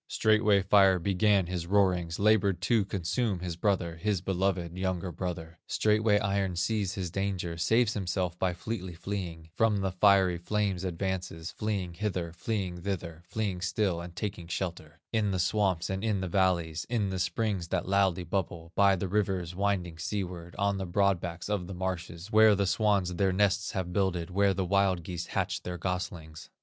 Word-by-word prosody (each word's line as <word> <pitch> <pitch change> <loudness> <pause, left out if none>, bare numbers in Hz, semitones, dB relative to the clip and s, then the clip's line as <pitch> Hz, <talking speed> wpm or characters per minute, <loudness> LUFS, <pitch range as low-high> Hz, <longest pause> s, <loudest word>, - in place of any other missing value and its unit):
Straightway 110 -2 +3
Fire 95 -1 +5
began 100 +2 +2
his 85 -1 -4
roarings, 90 -4 +2
Labored 100 -3 +3
to 110 +2 +3
consume 100 +1 -1
his 90 -2 -4
brother, 85 -3 0
His 100 +2 0
beloved 90 -2 -1
younger 95 -1 -2
brother. 85 -2 -5
Straightway 105 0 +3
Iron 100 -2 0
sees 100 +1 0
his 90 -3 -3
danger, 95 -3 -2
Saves 110 +7 +2
himself 90 -3 -2
by 90 -2 0
fleetly 95 -2 -5
fleeing, 85 -4 -5
From 110 +1 +2
the 95 -1 0
fiery 95 -2 +4
flame's 100 0 -1
advances, 90 -2 -3
Fleeing 100 -5 -3
hither, 90 -3 -3
fleeing 90 -1 -3
thither, 85 -4 -4
Fleeing 100 -2 -2
still 90 -1 0
and 85 0 -9
taking 90 -2 -4
shelter 85 -4 -5
In 110 -2 +2
the 95 - 0
swamps 95 -2 +1
and 95 +1 -3
in 105 -3 +1
the 95 - -2
valleys, 85 -3 +1
In 105 -5 0
the 95 - -2
springs 90 0 -1
that - - -2
loudly 95 -2 +2
bubble, 85 -2 -3
By 100 -1 +5
the 95 +1 -3
rivers 95 -3 -1
winding 90 -4 -1
seaward, 90 -2 -4
On 100 0 +1
the 95 - -3
broad 100 +1 +2
backs 85 -1 -5
of 100 -4 -2
the 95 - -6
marshes, 90 0 -4
Where 110 -1 +7
the 100 0 +1
swans 100 -2 +2
their 95 +1 +2
nests 100 +2 +1
have 90 -3 -3
builded, 90 -3 0
Where 100 +1 +3
the 95 0 -1
wild 95 -2 +2
geese 90 0 -5
hatch - - -2
their 90 0 -5
goslings. 85 -3 -5
95 Hz, 175 wpm, -29 LUFS, 85-100 Hz, -, Where